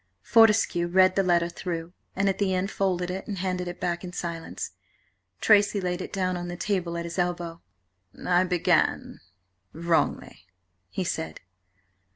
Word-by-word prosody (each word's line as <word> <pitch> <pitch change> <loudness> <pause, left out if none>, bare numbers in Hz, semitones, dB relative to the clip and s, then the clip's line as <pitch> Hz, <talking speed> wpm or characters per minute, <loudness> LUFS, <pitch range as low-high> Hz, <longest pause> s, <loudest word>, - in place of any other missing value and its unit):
Fortescue 220 -6 +4
read 185 +1 +4
the 195 - +4
letter 175 -2 +2
through, 170 -1 -5 0.2
and 200 +1 +1
at 195 -1 0
the 190 -2 +1
end 190 +3 -1
folded 180 -2 0
it 190 +1 -5
and 205 - -4
handed 180 -1 -2
it 175 - -6
back 175 0 -2
in 180 - -6
silence. 170 -2 -5 0.7
Tracy 205 -1 +5
laid 180 -1 -2
it - - -6
down 185 -2 -1
on 175 0 -4
the 175 0 -5
table 180 -4 -1
at 170 - -3
his 170 +2 -5
elbow. 175 -1 -2 0.6
"I 180 0 +4
began–wrongly," 95 - -1 0.4
he 185 - -3
said. 80 - -4
180 Hz, 155 wpm, -26 LUFS, 170-190 Hz, 0.7 s, Tracy